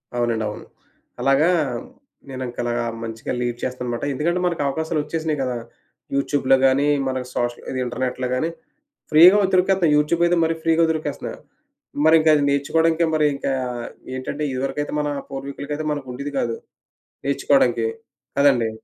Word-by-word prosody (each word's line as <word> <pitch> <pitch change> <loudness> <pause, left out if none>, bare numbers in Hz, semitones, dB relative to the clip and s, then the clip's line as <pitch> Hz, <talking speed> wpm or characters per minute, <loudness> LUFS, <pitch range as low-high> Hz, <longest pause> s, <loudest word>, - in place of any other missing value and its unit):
అవునండి. 120 -2 0
అవును. - - -8 0.6
అలాగా, 135 +5 +4 0.8
నేనింకలాగా 120 -2 -3 0.2
మంచిగా 115 0 -5
లీడ్ 120 -1 -2
చేస్తాననమాట. 125 -2 -3
ఎందుకంటే 170 +6 0
మనకు 170 -4 -1
అవకాశాలు 160 +3 -1
ఒచ్చేసినాయి 155 0 -2
కదా! 125 -2 -2 0.6
యూట్యూబ్‌లో 140 -1 +2
గానీ, 135 +2 +3 0.2
మనకు 130 -1 -3
సోషల్ 120 0 -2
ఇది 130 - -3
ఇంటర్నెట్‌లో 125 +1 -2
గాని, 160 +6 0 0.6
ఫ్రీగా 175 +6 +9
ఓ - - +2
దొరికేత్తాయి 180 -4 +3
యూట్యూబ్‌ 160 +3 +2
అయితే 175 0 +2
మరి 165 - +1
ఫ్రీగా 165 0 +3
దొరికేస్తున్నాయి. 155 -1 -4 0.7
మరి 160 +1 +7
ఇంకది 155 -2 +4
నేర్చుకోవడాకే 160 +4 +2
మరింకా 145 -3 +1 0.6
ఏంటంటే, 135 +3 -4
ఇదివరకైతే 135 +3 -3
మన 150 - -1 0.2
పూర్వీకులకైతే 140 +2 -5
మనకుండేది 140 0 -5
కాదు, 450 +11 -1 0.7
నేర్చుకోడానికి. 450 - +2 0.5
అదండీ. 125 -6 +4
145 Hz, 125 wpm, -22 LUFS, 130-160 Hz, 0.8 s, ఫ్రీగా